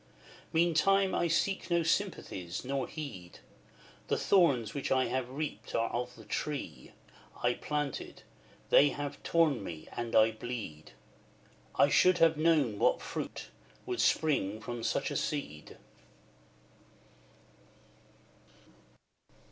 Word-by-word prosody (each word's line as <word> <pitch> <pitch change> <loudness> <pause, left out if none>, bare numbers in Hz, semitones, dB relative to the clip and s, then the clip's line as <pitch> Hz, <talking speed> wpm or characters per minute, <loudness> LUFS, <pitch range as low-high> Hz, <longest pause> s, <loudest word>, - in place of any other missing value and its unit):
Meantime 185 +4 +3
I 170 - +1
seek 170 +2 0
no 170 -1 +2
sympathies, 130 - -2
nor 135 -1 -2
need; 105 - -7 0.7
The - - +1
thorns 140 - +3
which 140 - -3
I 130 -1 +3
have 130 -1 -2
reaped 145 +3 -5
are 115 0 0
of 125 +1 -3
the 110 - -13
tree 105 - -4 0.5
I 120 0 +3
planted, 150 +2 -4 0.5
they 145 - +7
have 145 0 -5
torn 155 -9 +2
me, 80 -4 -8
and 120 -1 -4
I 110 0 +6
bleed: 110 -9 -7 0.8
I 145 - +5
should 185 +4 +5
have 165 -1 +5
known 150 -9 +2
what - - +3
fruit - - -6 0.4
would - - -2
spring 110 -10 +1
from 120 +1 -6
such - - -1
a - - -3
seed. 110 - -4
140 Hz, 115 wpm, -31 LUFS, 115-160 Hz, 0.8 s, they